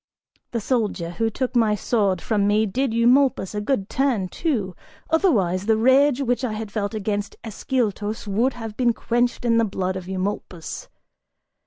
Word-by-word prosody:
The 235 Hz, -, -2 dB
soldier 210 Hz, -7 st, -1 dB
who 225 Hz, +5 st, 0 dB
took 255 Hz, +3 st, -3 dB
my 220 Hz, -3 st, +3 dB
sword 200 Hz, -5 st, 0 dB
from 205 Hz, -3 st, +1 dB
me 210 Hz, +1 st, +3 dB
did 255 Hz, +5 st, -1 dB
Eumolpus 240 Hz, -3 st, +3 dB
a 210 Hz, -, -2 dB
good 205 Hz, -3 st, -1 dB
turn, 245 Hz, -9 st, 0 dB
too; 210 Hz, -, -2 dB, 0.4 s
otherwise, 205 Hz, -, +2 dB
the 220 Hz, -1 st, +4 dB
rage 265 Hz, +3 st, +4 dB
which 245 Hz, 0 st, 0 dB
I 240 Hz, -4 st, -1 dB
had 215 Hz, -1 st, -5 dB
felt 210 Hz, 0 st, -2 dB
against 205 Hz, -1 st, -2 dB
Ascyltos 220 Hz, -2 st, -2 dB
would 225 Hz, +6 st, +1 dB
have 225 Hz, -3 st, -7 dB
been 240 Hz, -1 st, +2 dB
quenched 240 Hz, +2 st, -1 dB
in 230 Hz, -1 st, +3 dB
the -, -, +3 dB
blood 190 Hz, -3 st, -2 dB
of 185 Hz, -1 st, -6 dB
Eumolpus. 185 Hz, -3 st, -4 dB
220 Hz, 165 wpm, -23 LUFS, 200-245 Hz, 0.4 s, the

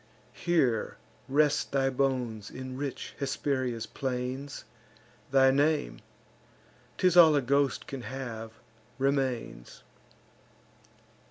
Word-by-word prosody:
Here 135 Hz, -11 st, 0 dB, 0.3 s
rest 145 Hz, +1 st, +2 dB
thy 135 Hz, -1 st, +2 dB
bones 125 Hz, -5 st, -1 dB
in 130 Hz, 0 st, -7 dB
rich 140 Hz, 0 st, -5 dB
Hesperia's 130 Hz, -4 st, -1 dB
plains; 130 Hz, +1 st, -4 dB, 0.6 s
Thy 135 Hz, 0 st, +5 dB
name 140 Hz, -, +1 dB, 1.0 s
('tis 180 Hz, -2 st, +3 dB
all 160 Hz, -3 st, +8 dB
a 145 Hz, -, +3 dB
ghost 140 Hz, +1 st, +1 dB
can 135 Hz, -5 st, -6 dB
have) 115 Hz, -4 st, -6 dB, 0.4 s
remains. 130 Hz, -, -2 dB
135 Hz, 90 wpm, -29 LUFS, 125-140 Hz, 1.0 s, all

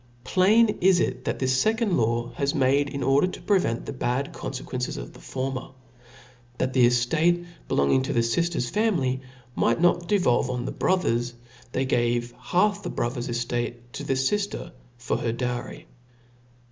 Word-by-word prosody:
Plain^it 210 Hz, +2 st, +3 dB, 0.2 s
it, 130 Hz, -5 st, -1 dB
that -, -, -1 dB
this 130 Hz, -1 st, +1 dB
fecond 225 Hz, -2 st, +1 dB
law 120 Hz, -1 st, 0 dB
was 140 Hz, 0 st, 0 dB
made, 140 Hz, +1 st, +2 dB
in 140 Hz, -1 st, -4 dB
order 135 Hz, +6 st, +3 dB
to 185 Hz, -, -7 dB
prevent 180 Hz, -, +1 dB
the -, -, -5 dB
bad 130 Hz, +1 st, -2 dB
confe 130 Hz, -1 st, -5 dB
quences 125 Hz, -1 st, -4 dB
of -, -, -7 dB
the -, -, -14 dB
former. 130 Hz, 0 st, -4 dB, 0.9 s
That 130 Hz, 0 st, -1 dB
the 125 Hz, -2 st, +6 dB
eftate 160 Hz, +9 st, +2 dB, 0.2 s
belonging 70 Hz, -, +2 dB
to 130 Hz, -, -2 dB
the 115 Hz, -, +3 dB
fiiler^s 125 Hz, +3 st, 0 dB
family 165 Hz, -, +1 dB, 0.3 s
might 115 Hz, -, +1 dB
not 175 Hz, 0 st, +2 dB
devolve 145 Hz, -11 st, +2 dB
on 125 Hz, -1 st, -2 dB
the -, -, -3 dB
bro 185 Hz, -, +2 dB
tber^s^ 120 Hz, -7 st, -1 dB, 0.4 s
they 130 Hz, +2 st, 0 dB
gave 120 Hz, -1 st, 0 dB
half 205 Hz, +3 st, +1 dB
the -, -, -5 dB
brother^s 120 Hz, 0 st, -3 dB
eftate 120 Hz, 0 st, -2 dB, 0.2 s
to -, -, -5 dB
the 135 Hz, -, 0 dB
fifter 200 Hz, +10 st, -1 dB, 0.3 s
for 120 Hz, -, -2 dB
her 115 Hz, -, -1 dB
dowry. 120 Hz, +1 st, -4 dB
130 Hz, 165 wpm, -25 LUFS, 120-175 Hz, 0.9 s, the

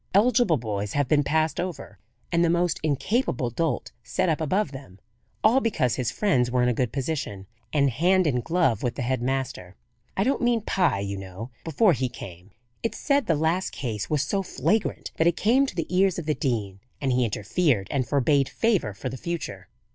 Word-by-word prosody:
"Eligible 225 Hz, -5 st, +4 dB
boys 105 Hz, -3 st, -3 dB
have 145 Hz, -2 st, +1 dB
been 145 Hz, +2 st, +3 dB
passed 155 Hz, +2 st, +1 dB
over, 175 Hz, -, -5 dB, 0.3 s
and 170 Hz, -1 st, +3 dB
the 170 Hz, -, +3 dB
most 175 Hz, 0 st, +1 dB
incapable 150 Hz, -, 0 dB
dolt 130 Hz, -5 st, -1 dB
set 185 Hz, +10 st, -1 dB
up 160 Hz, -1 st, 0 dB
above 185 Hz, +3 st, 0 dB
them; 135 Hz, -9 st, -10 dB, 0.5 s
all 230 Hz, +5 st, +5 dB
because 160 Hz, -, +1 dB
his 125 Hz, -3 st, -1 dB
friends 130 Hz, -, +1 dB
were 125 Hz, 0 st, +2 dB
in -, -, +3 dB
a -, -, +2 dB
good 125 Hz, 0 st, -1 dB
position, 135 Hz, -9 st, -3 dB, 0.3 s
and 140 Hz, -3 st, +3 dB
hand 180 Hz, +8 st, +3 dB
in 125 Hz, -5 st, +1 dB
glove 165 Hz, -, +1 dB
with 120 Hz, -2 st, -1 dB
the 130 Hz, -, -3 dB
head 130 Hz, 0 st, -1 dB
master. 125 Hz, -8 st, -3 dB, 0.4 s
I 195 Hz, -, +3 dB
don't 265 Hz, +3 st, +1 dB
mean 240 Hz, -2 st, +2 dB
Pye, 180 Hz, -, +1 dB
you 100 Hz, 0 st, -3 dB
know; 95 Hz, +5 st, -8 dB
before 170 Hz, +5 st, +3 dB
he 130 Hz, -2 st, -1 dB
came. 90 Hz, -3 st, -10 dB, 0.3 s
It's 230 Hz, -, -2 dB
said 280 Hz, -4 st, +1 dB
the 165 Hz, -, +3 dB
last 160 Hz, +5 st, 0 dB
case 110 Hz, -6 st, -4 dB
was 150 Hz, -2 st, +1 dB
so 195 Hz, +7 st, 0 dB
flagrant 210 Hz, +3 st, -1 dB
that 160 Hz, -, +3 dB
it 170 Hz, -, +2 dB
came 260 Hz, +6 st, +3 dB
to -, -, -6 dB
the 165 Hz, -, -1 dB
ears 190 Hz, -1 st, +3 dB
of 175 Hz, -, -4 dB
the 155 Hz, -, +1 dB
dean, 105 Hz, -9 st, -2 dB, 0.2 s
and 135 Hz, -2 st, 0 dB
he 125 Hz, 0 st, +2 dB
interfered 115 Hz, -, 0 dB
and 130 Hz, -3 st, 0 dB
forbade 140 Hz, 0 st, +2 dB
favour 200 Hz, -, 0 dB
for 130 Hz, -, -5 dB
the 130 Hz, +1 st, -5 dB
future. 170 Hz, +3 st, -5 dB
145 Hz, 200 wpm, -25 LUFS, 120-180 Hz, 0.5 s, all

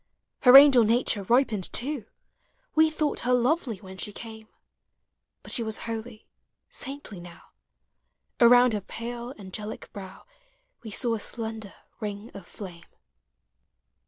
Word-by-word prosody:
Her 250 Hz, -3 st, +7 dB
augel 275 Hz, -3 st, +9 dB
uature 225 Hz, -4 st, 0 dB
ripened 230 Hz, -6 st, +2 dB
too: 265 Hz, -3 st, 0 dB, 0.7 s
We 315 Hz, 0 st, +4 dB
thought 310 Hz, -1 st, -2 dB
her 250 Hz, -, 0 dB
lovely 250 Hz, -, +1 dB
when 190 Hz, 0 st, -12 dB
she 210 Hz, -, -3 dB
came, 220 Hz, 0 st, -10 dB, 1.0 s
Hut -, -, -10 dB
she -, -, -2 dB
was 220 Hz, -1 st, -2 dB
holy, 225 Hz, 0 st, -6 dB, 0.5 s
saintly 270 Hz, -8 st, -4 dB
now... 175 Hz, 0 st, -14 dB, 0.9 s
Around 245 Hz, 0 st, +6 dB
her 210 Hz, -, -2 dB
pale 235 Hz, +4 st, -7 dB
angelic 210 Hz, +2 st, -8 dB
brow 195 Hz, -2 st, -10 dB, 0.6 s
We 225 Hz, -, -9 dB
saw 235 Hz, +3 st, 0 dB
a 225 Hz, -, -2 dB
slender 220 Hz, -2 st, -6 dB, 0.2 s
ring 210 Hz, +2 st, -6 dB
of 195 Hz, -3 st, -11 dB
flame. 175 Hz, -4 st, -10 dB
225 Hz, 130 wpm, -26 LUFS, 205-245 Hz, 1.0 s, augel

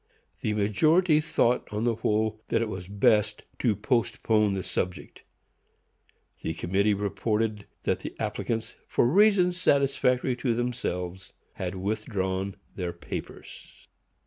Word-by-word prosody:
The 110 Hz, -, 0 dB
majority 155 Hz, -, +4 dB
thought, 125 Hz, -7 st, +1 dB
on 105 Hz, +1 st, -2 dB
the 120 Hz, -1 st, +2 dB
whole, 110 Hz, 0 st, 0 dB
that -, -, +1 dB
it 115 Hz, -1 st, -1 dB
was 95 Hz, -3 st, -6 dB
best 105 Hz, +1 st, +2 dB, 0.2 s
to 110 Hz, -4 st, +2 dB
postpone 110 Hz, -2 st, +1 dB
the 95 Hz, -, -3 dB
subject. 90 Hz, 0 st, -4 dB, 1.2 s
The 80 Hz, -, -3 dB
committee 100 Hz, +5 st, +1 dB
reported 105 Hz, +1 st, -1 dB, 0.2 s
that -, -, 0 dB
the -, -, -7 dB
applicants, 115 Hz, 0 st, -2 dB
for -, -, +2 dB
reasons 180 Hz, -, +4 dB
satisfactory 135 Hz, -5 st, +2 dB
to 120 Hz, -2 st, 0 dB
themselves, 95 Hz, -7 st, -3 dB, 0.2 s
had 95 Hz, 0 st, -4 dB
withdrawn 95 Hz, -1 st, -2 dB, 0.2 s
their 90 Hz, -2 st, -3 dB
papers. 85 Hz, -, -9 dB
110 Hz, 120 wpm, -27 LUFS, 95-125 Hz, 1.2 s, majority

